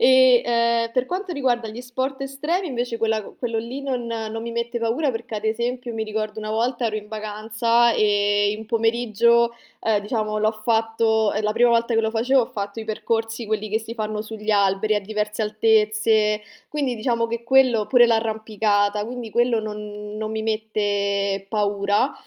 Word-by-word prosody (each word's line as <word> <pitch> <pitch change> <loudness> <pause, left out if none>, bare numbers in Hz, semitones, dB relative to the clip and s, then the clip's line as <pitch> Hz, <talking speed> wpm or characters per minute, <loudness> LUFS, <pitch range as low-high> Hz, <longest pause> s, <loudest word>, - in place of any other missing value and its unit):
E, 260 -1 +6
ehm, 235 -1 +2
per 255 0 +1
quanto 370 +3 -3
riguarda 250 -6 0
gli 220 +3 -7
sport 260 +2 -4
estremi, 300 +7 -2
invece, 245 -3 -2
quella 220 -1 +1 0.2
quello 230 -2 -2
lì 235 +5 -5
non 255 -3 -2
non 225 -1 -4
mi 235 0 -5
mette 235 +1 -2
paura 240 +6 0
perché, 230 -1 -6
ad 210 - -4
esempio, 235 +2 -2
mi 220 -1 -3
ricordo 215 0 -4
una 215 0 -4
volta 235 +2 0
ero 215 -1 -2
in 210 -1 -7
vacanza 220 +2 +1
e 205 -1 +2
in 220 - -8
pomeriggio, 235 +1 +2 0.3
ehm, 220 -2 +2
diciamo 215 0 -2
l'ho 215 +1 +2
fatto 220 0 +1
è 210 - -1
la 210 0 +1
prima 240 +2 +4
volta 235 0 +2
che 225 - +4
lo 220 0 0
facevo, 245 +4 +3
ho - - -3
fatto 200 0 -5
i 220 - -7
percorsi 225 +1 -2
quelli 215 0 -2
che 220 +2 0
si 225 +1 -8
fanno 215 -2 -3
sugli 215 0 -5
alberi 200 +1 +2
a 210 - +1
diverse 210 +1 -3
altezze, 215 0 +2 0.3
quindi 280 -4 -1
diciamo 230 0 0
che 235 0 -4
quello 245 -3 +4
pure 245 -2 +6
l'arrampicata, 215 -2 +1
quindi 240 0 -6
quello 240 +1 +2
non 210 -1 -7
non 215 0 -3
mi 220 0 -3
mette 205 -3 -1
paura 205 +4 +1
225 Hz, 180 wpm, -23 LUFS, 215-235 Hz, 0.3 s, E